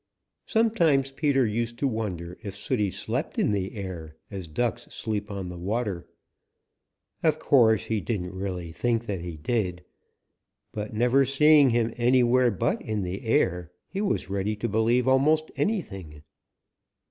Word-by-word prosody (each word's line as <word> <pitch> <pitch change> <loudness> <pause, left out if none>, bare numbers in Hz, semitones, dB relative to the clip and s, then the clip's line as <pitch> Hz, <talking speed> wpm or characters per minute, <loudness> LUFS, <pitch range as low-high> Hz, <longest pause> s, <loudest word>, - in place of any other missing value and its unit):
Sometimes 170 - +2
Peter 135 -2 +2
used 115 +2 -2
to 140 - +1
wonder 90 -8 -4
if 100 -2 -7
Sooty 105 -6 -1
slept - - -3
in - - +2
the 100 -1 -2
air 90 -6 -6 0.2
as 95 -4 -6
Ducks 120 +9 -2
sleep 105 -2 -4
on 95 -3 -5
the 90 -1 -8
water. 100 -2 -2 1.1
Of 155 -2 +2
course, 115 -8 +4
he 110 -2 -1
didn't 95 -5 -3
really 95 -3 -4
think 115 +5 -1
that 100 -5 -3
he 85 -2 -6
did, 90 0 -2 0.9
but 105 0 -5
never 120 +5 +3
seeing 145 +1 +5
him 115 -1 +1
anywhere 125 0 +4
but 100 -6 -1
in 105 -2 -2
the 90 +5 -4
air, 90 -5 +1 0.2
he 195 - -3
was 200 -2 -1
ready 100 +2 -1
to 110 +3 -3
believe 115 +3 +2
almost 150 +4 +3
anything. 95 - -3
110 Hz, 145 wpm, -26 LUFS, 95-130 Hz, 1.1 s, seeing